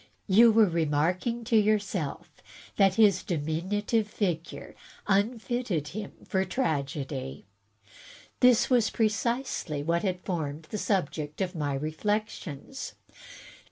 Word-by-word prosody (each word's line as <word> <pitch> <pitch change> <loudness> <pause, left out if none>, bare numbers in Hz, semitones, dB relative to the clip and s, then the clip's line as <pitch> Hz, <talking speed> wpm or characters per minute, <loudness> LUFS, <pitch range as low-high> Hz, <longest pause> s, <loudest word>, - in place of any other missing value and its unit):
You 225 +4 +6
were 220 0 +6
re 170 -3 0
marking 180 +11 0
to 225 - 0
yourself 205 -7 +1 0.5
that 195 -2 +4
his 200 -4 +5
diminutive 190 +8 -1
figure 180 -6 -3 0.3
unfitted 210 - 0
him 215 +2 -6
for 190 -1 +1
tragedy." 140 - -3 0.9
This 250 -1 +5
was 240 -4 +3
precisely 220 - -1
what 170 +2 +1
had 180 -2 -2
formed 160 -5 -3
the 215 - -3
subject 155 -7 -1
of 190 -2 -1
my 145 -5 -2
reflections. 205 - -3
190 Hz, 110 wpm, -28 LUFS, 155-215 Hz, 0.9 s, You